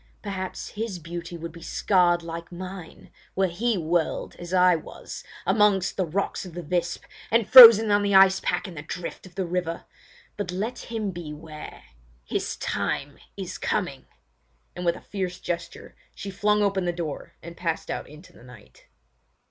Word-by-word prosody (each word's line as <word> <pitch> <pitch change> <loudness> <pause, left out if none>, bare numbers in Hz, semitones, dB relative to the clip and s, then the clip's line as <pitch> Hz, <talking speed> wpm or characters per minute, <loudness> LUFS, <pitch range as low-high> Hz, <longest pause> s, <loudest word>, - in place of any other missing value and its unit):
Perhaps 190 -3 -5
his 220 -3 -4
beauty 170 +1 -7
would 165 0 -7
be 170 +1 -13
scarred 175 -1 +2
like 170 +1 -7
mine 180 -1 -9 0.2
were 195 - +3
he 205 +5 0
whirled, 165 0 -1
as 175 0 -9
I 180 -1 +5
was, 160 - -8 0.2
among 210 -3 +4
the 185 -3 -1
rocks 195 +5 -2
of 180 -3 -10
the 175 - -5
Visp, 175 +2 -2 0.3
and 230 -1 +2
frozen 225 -4 +11
on 205 0 +4
the 200 -1 +1
ice 190 0 +7
pack - - -1
in 185 - -9
the 150 - -7
drift 175 +4 -7
of 180 - -19
the 190 -1 -1
river. 175 -1 -3 0.5
But 205 -3 -3
let 215 +7 -3
him 220 -4 -2
beware! 155 -2 -9 0.4
His - - -2
time - - -3 0.2
is - - -6
coming!" - - -2 0.7
and 180 - -5
with 170 0 +2
a - - -11
fierce 185 -3 -4
gesture 170 -1 -5 0.2
she 195 - -6
flung 210 +2 +2
open 195 -2 +1
the 175 - +1
door 165 -4 -5
and 170 +1 -9
passed 165 -2 -3
out - - -5
into 150 +5 -15
the - - -18
night. 120 -3 -16
180 Hz, 170 wpm, -25 LUFS, 170-195 Hz, 0.7 s, frozen